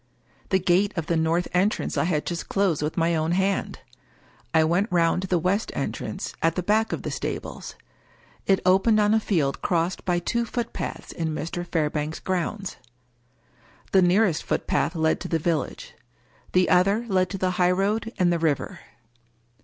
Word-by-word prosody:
The 190 - +4
gate 190 +2 +1
of 165 - -1
the 170 - 0
north 165 +2 +1
en 185 +3 +4
trance - - -4
I - - +1
had 155 -4 0
just 170 -1 -4
closed 195 -7 +1
with 150 +1 -3
my 170 0 +2
own 160 +1 0
hand. 190 +2 -1 0.7
I 160 -2 +4
went 180 +6 +1
round 170 0 +2
to 190 - -4
the 180 - +2
west 185 +6 0
entrance, - - -4
at 165 0 +2
the 180 - -2
back 215 +4 +2
of - - -3
the - - -3
stables. - - -5 0.7
It 195 -1 +3
opened 195 +4 +4
on 210 0 +3
a 220 - +4
field 160 -10 0
crossed 170 +1 0
by 180 -1 +1
two 235 +7 -1
footpaths 235 0 -5
in 160 -2 -3
Mr. 170 +3 -4
Fairbank's 155 -2 -2
grounds. 190 +2 -3 1.1
The 190 - +5
nearest 180 -1 +3
footpath - - -1
led 160 -1 +1
to - - -5
the 165 - +1
village. 170 - -2 0.6
The 180 0 +3
other 195 +6 +3
led 185 -3 +1
to 195 - -4
the 185 -1 0
highroad 195 +5 +1
and 175 -2 +3
the 170 - 0
river. 155 -4 -1
180 Hz, 175 wpm, -25 LUFS, 165-195 Hz, 1.1 s, The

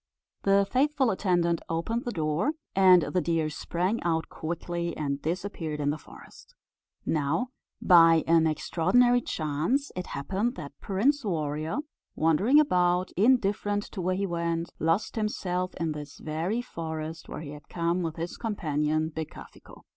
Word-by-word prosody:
The 195 0 +3
faithful 265 +1 +2
attendant 175 -3 +1
opened 225 +9 -2
the 240 - -2
door, 160 - 0 0.2
and 185 -3 +7
the 180 - 0
deer 165 -2 0
sprang 180 +8 -1
out 165 -1 -1
quickly, 170 +1 -4
and 140 -2 -2
disappeared 165 -2 -3
in 145 0 +1
the 150 - -3
forest. - - -15 0.5
Now, 160 - 0 0.3
by 165 -2 +7
an 165 -1 +4
extraordinary 190 +11 +3
chance, 165 - -1
it 180 0 -4
happened 195 - -2
that 145 - -7
Prince 255 +9 +1
Warrior, 155 - -2 0.3
wandering 190 - +4
about, 180 -9 +2
indifferent 205 -2 +2
to 195 - -5
where 185 +1 0
he 200 +1 -1
went, 170 -1 -2
lost 165 +9 0
himself 185 -4 -2
in 165 -2 -2
this 150 -1 -7
very 170 +10 -2
forest, 160 -5 -6
where - - -6
he 145 -3 -7
had 150 0 -12
come 170 +1 0
with 165 -2 -3
his 170 +1 -5
companion 155 -7 -1
Becafico. 160 -1 -9
170 Hz, 145 wpm, -28 LUFS, 160-200 Hz, 0.5 s, and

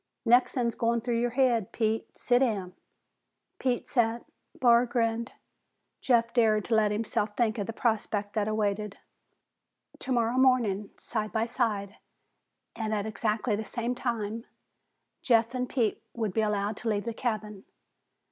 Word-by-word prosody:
"Next'un's 240 0 +3
goin' 235 0 +1
through 235 0 -1
your 240 +1 +1
haid, 240 -5 +1
Pete. 220 -1 -2
Si' 245 -1 +3
down." 205 -8 0 0.9
Pete 250 -2 -1
sat. 235 -2 0 0.3
Barr 240 -1 +5
grinned. 230 0 -1 0.7
Jeff 235 -2 +2
dared 220 -2 +2
let 220 -2 +4
himself 210 -1 -2
think 230 -2 +1
of 200 - -2
the - - -2
prospect 215 -3 -1
that 215 -2 0
awaited. 210 -1 -1 1.0
Tomorrow 240 -1 0
morning, 230 -7 +3
side 215 -2 -4
by 225 0 0
side 210 -5 -2 0.8
and 220 -1 -2
at 205 -1 -2
exactly 215 +1 -1
the 215 - -3
same 235 +3 -3
time, 230 -2 -3 0.8
Jeff 230 -1 +3
and 250 -1 -2
Pete 235 -6 0
would 220 -5 -2
be 220 - +2
allowed 210 -1 -1
to 235 - -2
leave 205 -1 -1
the 230 - -3
cabin. 215 -4 -4
225 Hz, 140 wpm, -28 LUFS, 210-240 Hz, 1.0 s, Barr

